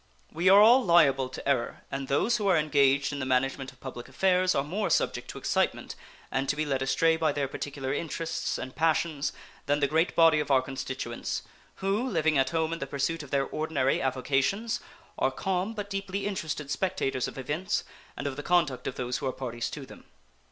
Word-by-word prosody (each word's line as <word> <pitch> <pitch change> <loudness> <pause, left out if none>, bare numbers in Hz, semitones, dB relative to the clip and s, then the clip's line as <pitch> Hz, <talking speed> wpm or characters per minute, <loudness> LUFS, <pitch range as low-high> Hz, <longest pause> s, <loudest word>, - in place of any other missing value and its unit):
We 170 +4 +2
are 195 +1 +8
all 240 +5 +7
liable 140 - +4
to 130 - -8
error, 135 -4 0
and 135 0 -3
those 225 - +2
who 210 -3 -1
are 185 -3 +5
engaged 140 -2 +3
in 140 - -4
the 130 - -2
management 135 +1 0
of - - -23
public 125 -3 -8
affairs 185 -1 +2
are 140 - +2
more 195 +8 -2
subject - - 0
to - - -7
excitement - - -1 0.4
and 135 0 -1
to - - +2
be 155 +1 -1
led 135 -2 -1
astray 160 +5 +2
by 160 -2 +2
their 145 -1 -1
particular 135 0 -4
interests 165 +2 -3
and 130 0 -7
passions 160 -2 +1 0.4
than 145 +1 +2
the 145 - +3
great 160 +4 +1
body 165 -2 +6
of 150 - -2
our 130 -2 +4
constituents, 130 -2 -4 0.4
who, 210 +7 +1
living 160 -5 +1
at 130 0 +2
home 160 +1 0
in 165 - -4
the 140 - -4
pursuit 140 +4 -1
of 145 - -10
their 140 0 +1
ordinary 155 -4 0
avocations, 135 - 0 0.4
are - - +3
calm 190 +3 -2
but 205 -1 -4
deeply 195 0 -3
interested 155 -7 -3
spectators 145 -5 -1
of - - -9
events 160 +9 -2 0.3
and - - -5
of 140 -1 -3
the - - -3
conduct 150 -7 +1
of - - -3
those 125 -1 -2
who - - -3
are - - 0
parties 120 -3 -4
to 145 -3 -7
them. - - -14
145 Hz, 205 wpm, -28 LUFS, 135-175 Hz, 0.4 s, are